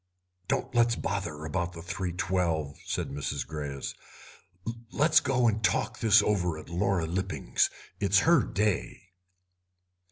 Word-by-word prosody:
"Don't - - -1
let's 120 -1 +4
bother 85 -9 -3
about 85 +2 -2
the 85 - -8
3.12," 90 -4 -1
said - - -2
Mrs. 70 0 -3
Greyes; 70 -2 -5 1.0
"let's 155 +1 +5
go 130 -4 +2
and 110 -1 0
talk - - +1
this 110 -1 +6
over 90 -6 +1
at 80 - -10
Laura 90 0 +1
Lipping's. 95 +4 0 0.3
It's 100 -1 +3
her 165 -4 +6
day." 100 -2 -1
95 Hz, 125 wpm, -29 LUFS, 85-105 Hz, 1.0 s, this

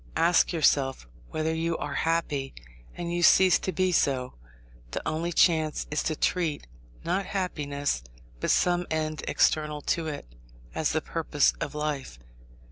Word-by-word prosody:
Ask 165 +1 +4
yourself 140 - +1 0.2
whether 155 +1 -1
you 165 +1 -1
are 145 - -4
happy, 150 -5 -1 0.4
and 170 0 -4
you 175 - -1
cease 185 +2 +6
to 185 - -2
be 185 0 +1
so. 130 -6 +1 0.6
The - - -5
only 165 +2 -1
chance 160 -3 +2
is 150 - 0
to 155 - -1
treat, 165 -2 -1 0.4
not 185 +3 -1
happiness, 145 - -2 0.4
but - - -2
some 175 0 +2
end 155 -1 -2
external 150 -1 +1
to 165 -1 -4
it, 150 -2 -5 0.5
as - - 0
the - - +1
purpose - - +1
of - - -4
life. 150 - -3
155 Hz, 145 wpm, -27 LUFS, 145-170 Hz, 0.6 s, cease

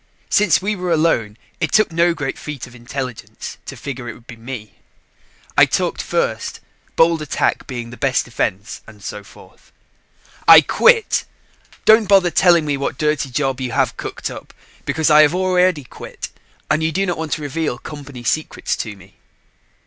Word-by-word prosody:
Since 205 -3 +3
we 210 +1 0
were 180 -2 -3
alone, 155 -10 +1 0.2
it - - -1
took 215 -4 +3
no 170 +1 +2
great 140 -3 -4
feat 150 -4 -6
of 125 - -15
intelligence 125 0 -7
to - - -6
figure 130 -3 -6
it - - -7
would 115 - -18
be 120 - -10
me. 115 -3 -9 0.8
I - - +7
talked - - -1
first, - - -2 0.4
bold 165 -1 +4
attack 150 - -1
being 120 -2 -6
the 120 - -10
best 135 -3 +1
defense 105 -3 -3
and 105 -2 -15
so 105 - -6
forth. - - -18 0.8
"I - - +11
quit. 465 -2 +3 0.6
Don't 220 -2 +6
bother 190 -3 +5
telling 170 -3 +4
me 145 -2 0
what 135 -1 -3
dirty 150 -2 0
job 135 0 -1
you 125 -3 -3
have - - +1
cooked - - -5
up, - - -11 0.3
because 160 -1 +1
I 150 0 +8
have 150 +3 +4
already 180 -4 +2
quit 125 - -9 0.4
and 155 +1 +1
you 160 0 +1
do 195 +5 0
not 175 -3 -2
want 160 -2 -2
to 155 - -3
reveal 145 -2 -2
company 140 -4 -9
secrets 155 +6 -1
to 105 -3 -5
me." 95 0 -19
145 Hz, 175 wpm, -19 LUFS, 120-170 Hz, 0.8 s, I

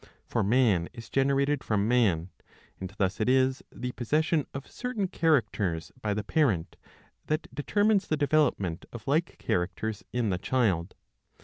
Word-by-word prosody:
For - - -1
man 105 -6 +3
is 115 -2 -11
generated 140 +1 +2
from 105 -1 +1
man; 95 -8 +2 0.5
and 95 - -5
thus 100 +1 0
it 110 - +2
is 130 0 +3
the 125 0 -5
possession 150 +5 0
of 135 0 -6
certain 245 -6 -3
characters 105 - 0
by 105 -3 -1
the 105 - -2
parent 110 - +1 0.5
that 155 - -1
determines 205 +8 +2
the 155 - 0
development 145 - +1
of 120 0 -10
like 160 +5 0
characters 100 +2 -2
in 120 -4 0
the 90 - -1
child. 100 -8 0
125 Hz, 145 wpm, -28 LUFS, 100-145 Hz, 0.5 s, man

